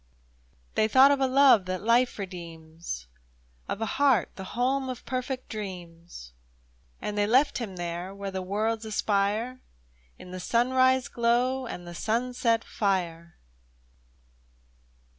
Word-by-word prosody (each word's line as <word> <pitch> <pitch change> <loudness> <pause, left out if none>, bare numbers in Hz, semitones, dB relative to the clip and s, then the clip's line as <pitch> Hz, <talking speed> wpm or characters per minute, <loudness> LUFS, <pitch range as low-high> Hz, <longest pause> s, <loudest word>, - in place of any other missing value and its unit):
They 215 - +2
thought 265 +5 +7
of 280 - +2
a 265 - +2
love 260 -6 +5
that 185 0 -3
hfe 235 +3 +2
redeems, 165 - -7 0.6
Of 210 - -3
a - - +1 0.2
heart 265 -9 +4
the 190 - -7
home 260 +2 +1
of 250 -2 -7
perfect 255 0 -4
dreams, 175 - -8 0.7
And 210 - -4
they 205 0 +1
left 260 +6 +3
him 210 -6 -5
there, 175 +1 -4
where 200 0 -6
the 190 0 -3
worlds 215 +4 -1
aspire 215 +3 -1 0.6
In 180 - -12
the 185 - -6
sunrise 255 +5 +2
glow 245 +2 +1
and 175 -5 -7
the 175 - -7
sunset 230 +3 0
fire 170 -5 -2
215 Hz, 130 wpm, -27 LUFS, 185-250 Hz, 0.7 s, thought